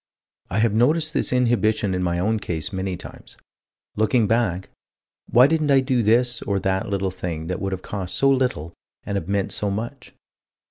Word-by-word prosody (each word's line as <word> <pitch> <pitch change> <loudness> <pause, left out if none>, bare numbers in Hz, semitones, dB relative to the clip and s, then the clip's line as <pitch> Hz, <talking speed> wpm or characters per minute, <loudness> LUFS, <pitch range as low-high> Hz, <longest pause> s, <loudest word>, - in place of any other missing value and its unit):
I 95 - -2
have 110 -1 +2
noticed 155 +7 +2
this - - 0
inhibition 110 -5 +1
in 90 - -1
my 85 -1 0
own 110 +5 0
case 90 +2 -4
many 95 -1 -3
times. - - -12 0.6
Looking 110 +2 +2
back 105 -5 0 0.6
why 125 +2 +6
didn't 155 0 +1
I 135 -1 +6
do 130 -2 +1
this 120 +2 +2
or 100 -1 -1
that 95 0 -1
little 100 -1 -1
thing 85 -3 -5
that 90 +2 -4
would 95 -1 -2
have 95 -1 -5
cost 95 -3 -4
so 135 - +3
little 125 - 0 0.3
and 100 - -4
have 90 -4 -3
meant 100 -1 0
so 105 - -1
much? 120 +6 -6
105 Hz, 185 wpm, -23 LUFS, 95-120 Hz, 0.6 s, why